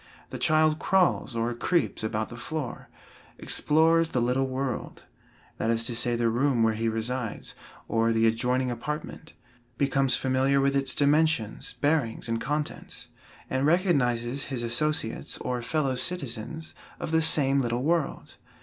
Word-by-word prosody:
The - - -5
child 155 0 +3
crawls 180 -9 +1
or 115 +1 -1
creeps 165 +2 0
about 110 0 -2
the 120 - -8
floor; 140 +2 -5 0.5
explores 165 +2 +3
the 125 - -1
little 125 +3 +1
world 130 -1 -4 0.6
that 110 - 0
is 115 0 +2
to 120 - -1
say, 120 0 +1
the 120 0 +1
room 120 +1 +2
where 110 0 +3
he 115 +1 -1
resides, 115 +1 -3 0.3
or 115 0 +1
the 115 0 +2
adjoining 125 +3 +1
apartment 150 +6 -6 0.4
becomes 135 -2 +2
familiar 135 +1 +2
with 140 0 +2
its 135 -1 +1
dimensions, 145 -6 +1
bearings 145 -7 +1
and 115 0 -1
contents, 150 +2 -4 0.4
and 130 +2 0
recognizes 135 -8 +1
his 130 -3 -3
associates 120 0 -1
or 125 -1 -3
fellow 135 +2 0
citizens 140 0 -3 0.3
of - - -4
the 160 0 +3
same 140 -3 +4
little 120 0 -1
world. 165 -1 -1
130 Hz, 145 wpm, -27 LUFS, 120-150 Hz, 0.6 s, same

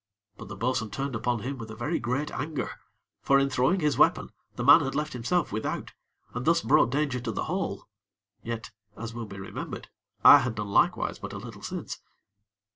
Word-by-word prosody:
But - - -10
the 100 - -7
bo'sun 115 +1 -1
turned 135 +4 -3
upon 120 0 -1
him 135 +1 -4
with 115 -1 -7
a 110 - -7
very 135 +9 -1
great 125 +6 -2
anger; 150 -1 -3 0.5
for 140 - +4
in 140 0 +2
throwing 170 +11 +2
his 150 -2 +1
weapon, - - +3 0.2
the - - -3
man 145 +4 +8
had 135 -1 -3
left 150 0 -2
himself 125 +9 0
without, 110 +2 -3 0.4
and 125 - -3
thus 165 +3 +3
brought 150 -4 +4
danger 140 -1 0
to 120 -1 -3
the - - -2
whole; - - -3 0.6
yet, 115 -1 -5 0.3
as 115 +1 -6
will 115 -1 -6
be 100 - -9
remembered, 95 - -7 0.4
I - - +11
had 120 -2 -2
done 105 -1 -4
likewise 100 - +2
but - - -7
a - - -5
little - - -9
since. - - -5
125 Hz, 200 wpm, -27 LUFS, 115-145 Hz, 0.6 s, I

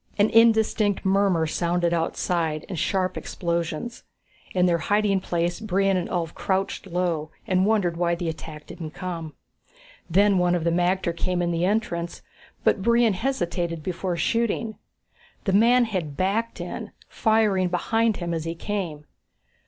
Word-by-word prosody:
An 205 +1 +3
indistinct 220 -3 +4
murmur 190 -4 +3
sounded 170 +2 0
outside, 165 -1 -1
and 180 -5 -4
sharp 185 -1 0
explosions. 170 +5 -3 0.5
In 180 -1 +4
their 170 -2 +2
hiding 205 +2 +2
place, 175 -1 -1
Brion 195 -2 +1
and 180 -1 -1
Ulv 170 -2 -2
crouched 195 0 -2
low 170 -4 -1 0.2
and 185 -2 +2
wondered 195 -6 +1
why 170 0 +1
the 170 0 -4
attack 155 -1 -6
didn't 160 -3 -8
come. 170 -4 -5 0.7
Then 195 +2 +4
one 180 0 +3
of 170 - -1
the 170 - +2
magter 175 0 +1
came 180 +1 -1
in 175 -1 0
the 170 +1 +1
entrance, 180 -5 -1 0.4
but 195 - +3
Brion 235 0 +4
hesitated 175 - -2
before 180 0 -2
shooting. 225 +3 0 0.7
The 195 - 0
man 240 +4 +5
had 175 -10 -4
backed 210 +5 0
in, - - -6
firing 215 -4 +2
behind 225 +5 +1
him 170 -1 -3
as 165 -1 -2
he 165 0 -3
came. 170 -6 -4
180 Hz, 150 wpm, -25 LUFS, 170-205 Hz, 0.7 s, man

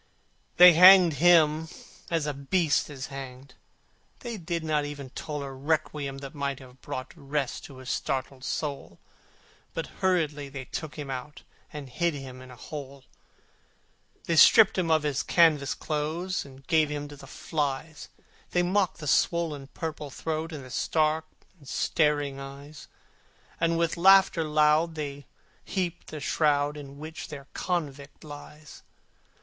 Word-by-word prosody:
They 180 0 +10
hanged 180 -2 +8
him 160 -2 +5 0.4
as 165 -3 0
a 150 - -2
beast 150 +4 +1
is 135 -3 -6
hanged: 130 -1 -9 0.7
They 235 -1 -5
did 170 -3 -4
not 155 -2 0
even 145 -3 -7
toll 150 0 -5
A 135 - -6
requiem 140 0 -2
that 135 - -9
might 140 -2 -3
have 130 -1 -15
brought 130 - -6
Rest 140 -3 -3
to 135 - -12
his 130 -1 -6
startled 130 0 -3
soul, 145 0 -4 0.8
But - - -2 0.2
hurriedly 155 -6 0
they 135 -1 -7
took 155 +3 -6
him 145 -3 -6
out, 130 +3 -7 0.3
And 150 -2 -7
hid 165 +6 -1
him 130 -2 -9
in 130 - -12
a 125 - -11
hole. 140 0 -9 1.2
The - - -19
warders 165 -2 +6
stripped 220 -3 +7
him 170 -3 0
of 160 -1 +3
his 145 -2 0
clothes, 160 +2 +1
And 135 -1 -15
gave 155 0 +3
him 145 0 -4
to 145 - -10
the 135 -1 -13
flies: 150 +1 -4 0.4
They 175 - +3
mocked 185 +1 +1
the 150 - -5
swollen 155 -2 +1
purple 155 0 -6
throat, 160 +4 -4
And 145 -4 -7
the 130 - -12
stark 155 +2 +1 0.3
and 140 - -17
staring 145 -3 0
eyes: 140 +2 -10 0.7
And 165 0 +1
with 170 -1 0
laughter 190 -1 +6
loud 155 +2 +2
they 145 -2 -6 0.4
heaped 180 -3 -3
the 155 - -7
shroud 145 0 +1
In 140 -1 -10
which 160 +3 -8
the 140 -2 -9
convict 145 -5 -4
lies. 150 0 -11
150 Hz, 150 wpm, -27 LUFS, 140-165 Hz, 1.2 s, They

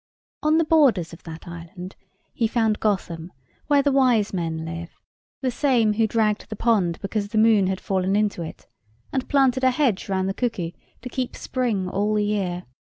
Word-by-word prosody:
On 305 +1 +3
the 330 - +3
borders 260 - +3
of 165 - -11
that 165 0 -9
island 175 +2 -9 0.4
he 230 - +1
found 220 -2 +1
Gotham, 180 -5 -2 0.4
where 285 -1 +4
the 285 - +3
wise 250 -7 +3
men 165 -3 -2
live; 165 +1 -6 0.5
the 255 - +1
same 240 -5 +2
who 220 +1 +2
dragged 215 -1 0
the 215 - -4
pond 200 -7 +1
because 200 +1 -2
the 215 +2 -3
moon 215 -3 +5
had 190 0 -1
fallen 190 0 0
into 210 -4 +1
it, 160 - -8 0.5
and 265 -1 -2
planted 265 -2 +3
a 260 - +6
hedge 250 -8 0
round 190 -1 0
the 195 - -1
cuckoo, 200 -8 -2 0.3
to 250 - -5
keep 255 0 -3
spring 230 -8 -1
all 205 +3 0
the 210 -1 +2
year. 190 -4 -1
210 Hz, 185 wpm, -24 LUFS, 185-245 Hz, 0.5 s, a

